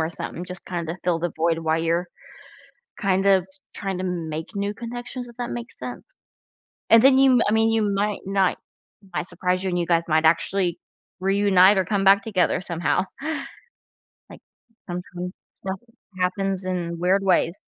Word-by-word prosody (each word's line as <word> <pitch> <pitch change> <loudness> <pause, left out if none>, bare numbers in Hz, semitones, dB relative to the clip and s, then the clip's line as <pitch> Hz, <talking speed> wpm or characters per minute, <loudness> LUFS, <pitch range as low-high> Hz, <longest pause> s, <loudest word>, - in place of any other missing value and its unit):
or 160 +1 0
something, 175 +1 -6
just 180 0 -9
kinda 170 -1 -4
fill 175 -2 +2
the 175 0 -2
void 165 0 +1
while 160 0 0
you're 170 +2 0 0.9
kind 195 0 +1
of 190 -2 +4 0.3
trying 195 -2 -3
to 185 - -3
make 165 -3 -4
new 200 +1 -1
connections, 245 +2 -6
if 235 - -15
that 245 -1 -4
makes 240 0 -7
sense, - - -7 0.9
and 225 0 +8
then 265 -1 +7
you 270 -1 +6
m 245 - +4
I - - 0
mean, 225 +1 +3
you 225 -1 +2
might 205 +1 -1
not 195 -1 +2 0.5
it 190 - -19
might 175 - -2
surprise 180 +1 -1
you 190 - 0
and 175 0 0
you 170 - 0
guys 170 -1 +3
might 160 0 +2
actually 175 +2 +2 0.4
reunite 195 0 +5
or 190 - +2
come 200 0 0
back 195 +1 +6
together 195 -6 +1
somehow. 175 +1 0 1.2
Like, - - -13 0.4
sometimes 180 0 -6 0.2
stuff 190 0 -5 0.4
happens 190 +1 -1
in 170 -2 -3
weird 190 +3 +2
ways. 180 -3 +3
185 Hz, 175 wpm, -24 LUFS, 175-200 Hz, 1.2 s, and